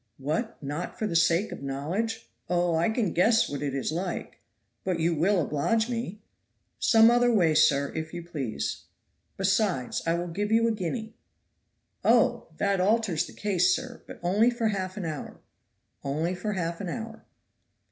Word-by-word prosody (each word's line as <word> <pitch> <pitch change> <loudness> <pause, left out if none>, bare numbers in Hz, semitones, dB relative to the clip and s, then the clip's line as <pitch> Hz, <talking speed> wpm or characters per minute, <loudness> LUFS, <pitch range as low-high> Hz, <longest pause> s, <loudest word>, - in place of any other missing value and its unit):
"What, 160 - -2
not 150 +5 -4
for 220 - -2
the 195 - -2
sake 170 +5 +3
of - - -7
knowledge?" 180 +12 -3 0.2
"Oh! 175 -1 +2
I 165 +5 +2
can 220 -6 0
guess 225 +6 +4
what 145 - -5
it 140 -2 -2
is 135 - -1
like." 175 +2 -4 0.4
"But 180 -3 -1
you 165 +1 +2
will 180 +5 +2
oblige 220 +10 0
me?" 215 -3 -4 0.6
"Some 225 0 +6
other 245 0 +4
way, 175 -8 +3
sir, 140 -2 +3
if 160 0 -4
you 175 -1 -6
please." 135 - -4 0.5
"Besides, 195 - +1
I 165 - +3
will 175 +1 -2
give 205 +5 -2
you 230 +1 +4
a - - +2
guinea." 220 +3 -4 0.9
"Oh! 240 +1 +3
that 200 -2 +1
alters 205 -4 +1
the - - -12
case, 185 -3 +2
sir. 250 -2 -7
But - - -10
only 205 +7 +4
for 235 -2 0
half 190 -1 -3
an 190 - -3
hour." 155 -3 -6 0.6
"Only 155 +6 -1
for 210 +3 -3
half 170 -2 -3
an 190 - -4
hour." 225 +3 -6
185 Hz, 170 wpm, -27 LUFS, 165-220 Hz, 0.9 s, Some